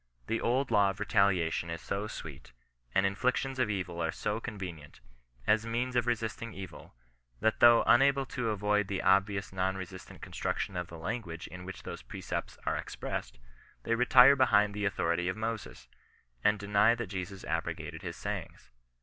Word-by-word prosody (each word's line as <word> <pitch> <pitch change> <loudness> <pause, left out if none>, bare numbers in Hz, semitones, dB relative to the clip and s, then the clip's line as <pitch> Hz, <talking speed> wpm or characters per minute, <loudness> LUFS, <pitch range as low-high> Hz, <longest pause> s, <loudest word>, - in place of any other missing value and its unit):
The 115 - -1
old 130 +3 +1
law 100 -1 +5
of 95 - -5
retaliation 100 -6 +2
is 85 0 -4
so 100 +2 -3
sweet, 70 -10 -9 0.4
and 95 - +4
inflictions 125 +6 0
of 125 -4 +2
evil 90 -4 -3
are 80 -1 0
so 105 +5 -2
convenient, 90 - -7 0.5
as 110 +1 +3
means 120 +2 -2
of 120 -1 +2
resisting 115 -1 -2
evil, 95 -9 -9 0.4
that 110 - +1
though 120 -1 +7
unable 135 +2 +5
to 125 -2 -2
avoid 105 -1 +1
the 95 -1 -2
obvious 100 +1 +2
non 95 0 0
resistant 95 -2 -9
construction 95 - -3
of 90 -1 -3
the 85 - -10
language 85 -1 -4
in 90 0 -9
which 95 0 -8
those - - -7
precepts - - -5
ate - - 0
expressed, - - -5 0.5
they 115 - 0
retire 125 +3 +7
behind 105 -6 +4
the 105 0 -2
authority 90 -3 0
of 95 - -2
Moaes, 110 0 -5 0.6
and 105 0 +4
deny 105 +3 +3
that 120 - -3
Jesus 95 0 -6
abrogated - - -3
his - - -5
sayings. - - -6
105 Hz, 165 wpm, -31 LUFS, 95-115 Hz, 0.6 s, though